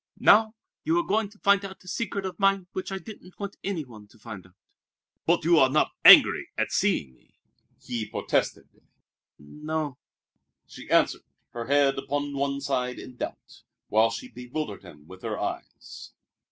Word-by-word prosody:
Now, 220 +1 +5 0.3
you 325 +2 +1
are 345 - +2
going 210 - 0
to 210 - -20
find 200 -1 +3
out 190 -1 -9
a - - -18
secret 200 -1 -3
of 190 - -6
mine 195 -1 +2
which 185 - -5
I 195 - -2
didn't 190 -3 -12
want 200 -1 -6
any 185 -6 -3
one 110 -4 -14
to 115 - -22
find 105 -4 -10
out." 95 - -27 0.7
"But 170 -1 +2
you 170 -1 +5
are 130 - +5
not 150 +3 +2
angry - - +8
at - - -1
seeing 65 - 0
me," - - -31 0.4
he 115 -3 -5
protested. - - -1 0.7
"N 75 - -15
n 155 - -8
o 160 0 0
o!" 135 -4 -9 0.7
she - - -13
answered, - - +3 0.3
her 120 -1 -6
head 140 -1 +3
upon 145 0 -3
one 140 0 -2
side 125 -3 -2
in 125 - -10
doubt, - - -8 0.3
while 110 +1 +4
she 115 - -6
bewildered 125 -1 -6
him 75 -1 -15
with 95 +3 -13
her - - -4
eyes. - - -7
145 Hz, 180 wpm, -26 LUFS, 120-195 Hz, 0.7 s, angry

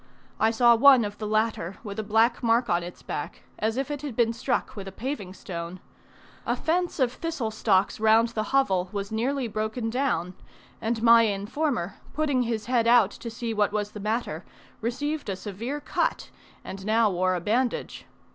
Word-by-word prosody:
I 220 - +4
saw 235 +1 +5
one 255 -1 +7
of 205 0 -7
the 215 - -3
latter 215 -4 0
with 205 -1 -6
a - - -1
black 225 +3 +2
mark 235 -1 +2
on 175 0 +2
its 175 +1 -9
back, 145 - -5 0.2
as 220 +2 0
if 275 +2 -2
it 290 -2 -4
had 285 -6 -5
been 230 -1 +2
struck 230 - -2
with 195 -2 -7
a - - -6
paving 205 -4 -5
stone. 170 -1 -6 0.6
A - - 0
fence 350 +1 -1
of 250 -2 +2
thistle 315 -10 -3
stalks 200 -3 +1
round 220 +1 +4
the 215 -2 -2
hovel 190 -10 +2
was 200 0 -4
nearly 250 +4 -1
broken 220 +2 -3
down, 230 -9 -1 0.5
and 225 0 -1
my 230 0 +8
informer, 205 - -2 0.2
putting 285 -4 +1
his 225 -3 -2
head 240 -2 +2
out 235 -4 +5
to 235 - -7
see 230 0 -4
what 210 -1 +1
was 210 0 -2
the 210 - -8
matter, 220 +4 -2 0.4
received 290 +5 -2
a 195 - -1
severe 225 +9 -5
cut, 290 - -2 0.3
and 190 0 -8
now 220 +1 +3
wore 185 +1 +1
a - - -1
bandage. 235 +8 -1
225 Hz, 185 wpm, -26 LUFS, 205-245 Hz, 0.6 s, my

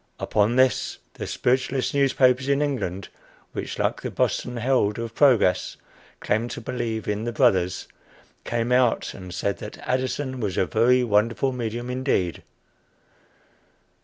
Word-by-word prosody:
Upon 105 +3 +1
this 130 0 +2 0.2
the - - -6
spiritualist 130 +1 0
newspapers 130 -1 +3
in 140 0 +3
England, 100 -10 -3 0.4
which, - - -5
like - - -1
the - - -3
Boston 125 0 -1
Herald 120 -4 +1
of 115 -1 -5
Progress, 120 -11 +3 0.4
claim 110 +3 0
to - - -6
believe 120 -3 -4
in 105 +2 -2
the 120 - -1
"Brothers," 90 -5 +2 0.6
came 120 +1 -2
out 125 -2 +2
and 90 -2 -9
said 100 +3 -2
that 105 - -8
Addison 130 +1 -1
was 100 -5 -2
a - - +3
very 125 +6 +3
wonderful 115 +4 +1
medium 120 0 -4
indeed. 125 - -1
120 Hz, 135 wpm, -24 LUFS, 105-130 Hz, 0.6 s, newspapers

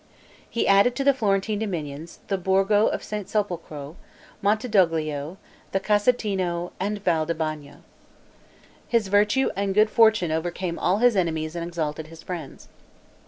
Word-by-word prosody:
He 235 - -1
added 200 +5 +5
to 275 - -1
the 280 0 +5
Florentine 205 -3 0
dominions, 165 -6 -5
the 195 -2 -1
Borgo 195 +3 +3
of - - -2
St. 210 -2 -5
Sepolcro, 170 -7 -4 0.4
Montedoglio, 175 - +1 0.4
the 195 - +2
Casentino 195 -5 0
and 205 +2 -3
Val 160 -4 +1
di 170 - -1
Bagno. 155 -3 -5 1.0
His 230 -5 +1
virtue 210 +6 +3
and 195 -1 -1
good 215 +1 +4
fortune 220 -7 +4
overcame 170 +2 -3
all 185 +3 +2
his 245 0 +4
enemies 160 -3 -1
and 170 - -3
exalted 160 -2 -4
his 165 0 -13
friends. 170 -6 -7
190 Hz, 140 wpm, -24 LUFS, 165-210 Hz, 1.0 s, added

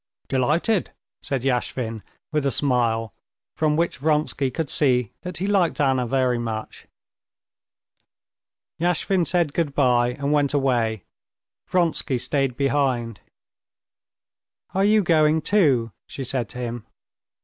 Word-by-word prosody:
"Delighted," 155 - 0 0.3
said 135 -3 -2
Yashvin 125 -3 -2 0.3
with 150 -2 0
a 140 - +2
smile, 120 -5 +1 0.4
from 155 -1 +1
which 170 -1 -1
Vronsky 150 -2 0
could 145 +3 -3
see 125 -6 +2
that 180 -1 -6
he 185 - -2
liked 195 -5 +1
Anna 130 -3 +2
very 125 -1 +1
much. 110 -2 -6 1.9
Yashvin 175 +1 +1
said 170 -5 +1
good 150 -5 -1
bye 125 -3 +3
and 140 +1 -1
went 145 -1 +2
away; 120 -7 0 0.6
Vronsky 165 -6 0
stayed 135 0 -1
behind. 130 -6 0 1.5
"Are 195 - +1
you 210 0 +4
going 155 -2 +3
too?" 140 - +2 0.2
she 135 - -6
said 125 -4 -2
to - - -7
him. 120 -2 -5
135 Hz, 120 wpm, -23 LUFS, 125-160 Hz, 1.9 s, you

